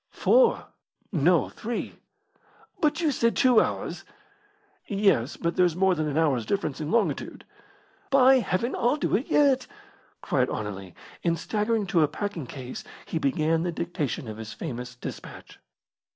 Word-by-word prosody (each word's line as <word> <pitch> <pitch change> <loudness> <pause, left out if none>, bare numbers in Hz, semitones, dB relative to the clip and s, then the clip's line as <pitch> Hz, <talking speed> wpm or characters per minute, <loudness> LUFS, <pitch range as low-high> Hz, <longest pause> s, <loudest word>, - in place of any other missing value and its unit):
"Four." - - +3 0.5
"No, 170 -1 +3
three." 230 +1 -5 0.9
"But 305 +2 +1
you 315 -3 +2
said 230 -3 +1
two 250 -4 +5
hours." - - -3 0.8
"Yes, 195 - +1
but 170 0 -2
there's 180 -3 +3
more 190 +1 +3
than 155 -3 -1
an 145 0 -2
hour's 145 -7 +2
difference 160 -8 -2
in 150 - -3
longitude." 230 +1 -1 0.6
"By 265 -1 +6
Heaven, 235 +2 -1
I'll 245 +5 +1
do 290 - 0
it 240 - -1
yet!" 275 -3 +3 0.5
cried 130 -2 0
Anerley, 95 -4 -5 0.3
and 170 -1 +1
staggering 210 +4 -1
to 175 -3 +2
a 150 - +4
packing 180 -6 -5
case, 130 -1 -7 0.2
he 165 - -3
began 155 +3 +1
the 175 +1 -1
dictation 165 -4 -3
of 110 -1 -7
his 110 -1 -7
famous 125 -5 -6
despatch. 125 - -9
175 Hz, 150 wpm, -26 LUFS, 140-230 Hz, 0.9 s, By